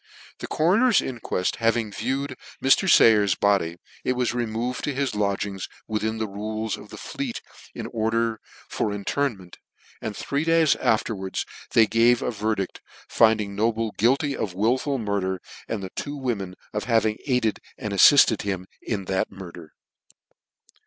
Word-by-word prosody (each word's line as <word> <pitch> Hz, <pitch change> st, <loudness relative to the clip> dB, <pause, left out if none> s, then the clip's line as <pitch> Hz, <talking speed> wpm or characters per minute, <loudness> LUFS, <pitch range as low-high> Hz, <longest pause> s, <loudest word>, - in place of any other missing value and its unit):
The -, -, -5 dB
coroner's 205 Hz, +9 st, +3 dB
inqueft 115 Hz, -7 st, -2 dB
having 115 Hz, -1 st, +1 dB
viewed 130 Hz, +6 st, -2 dB, 0.2 s
Mr. 135 Hz, +8 st, +4 dB
Sayer's 105 Hz, -, +6 dB
body, 95 Hz, -5 st, +1 dB, 0.3 s
it 130 Hz, -, +1 dB
was 125 Hz, -1 st, 0 dB
removed 120 Hz, +1 st, -2 dB
to 145 Hz, -, -2 dB
his 135 Hz, -3 st, -1 dB
lodgings 100 Hz, -2 st, -2 dB, 0.2 s
within 110 Hz, 0 st, -1 dB
the 110 Hz, -1 st, -2 dB
rules 110 Hz, +2 st, -3 dB
of -, -, -13 dB
the -, -, -10 dB
Fleet -, -, -5 dB, 0.4 s
in -, -, -5 dB
order 115 Hz, 0 st, -1 dB, 0.3 s
for 105 Hz, -, -1 dB
inter, 105 Hz, +8 st, 0 dB
ment; 95 Hz, -7 st, -13 dB, 0.4 s
and 110 Hz, -2 st, -5 dB
three 140 Hz, +2 st, -1 dB
days 165 Hz, -2 st, +4 dB
afterwards 110 Hz, -5 st, -1 dB, 0.3 s
they 115 Hz, -, +7 dB
gave 115 Hz, +2 st, +3 dB
a -, -, -1 dB
ver 110 Hz, 0 st, -1 dB
dict, 95 Hz, -2 st, -5 dB, 0.4 s
rinding 110 Hz, -3 st, +4 dB
Noble 110 Hz, +1 st, 0 dB
guilty 135 Hz, +7 st, +1 dB
of 95 Hz, -4 st, -3 dB
wilful 130 Hz, +7 st, +1 dB
murder, 100 Hz, -4 st, -1 dB, 0.3 s
and 105 Hz, -3 st, -3 dB
the 95 Hz, -, -6 dB, 0.2 s
women 110 Hz, -9 st, -3 dB, 0.2 s
of 105 Hz, -, -2 dB
having 110 Hz, -2 st, +2 dB
aided 125 Hz, -5 st, +1 dB, 0.2 s
and 105 Hz, -2 st, -4 dB
affifted 140 Hz, +8 st, +6 dB
him 95 Hz, -2 st, -3 dB, 0.2 s
in 100 Hz, -4 st, -3 dB
C 95 Hz, -, -3 dB
that 95 Hz, -, 0 dB
murder. 85 Hz, -4 st, -10 dB
110 Hz, 150 wpm, -24 LUFS, 100-125 Hz, 0.4 s, they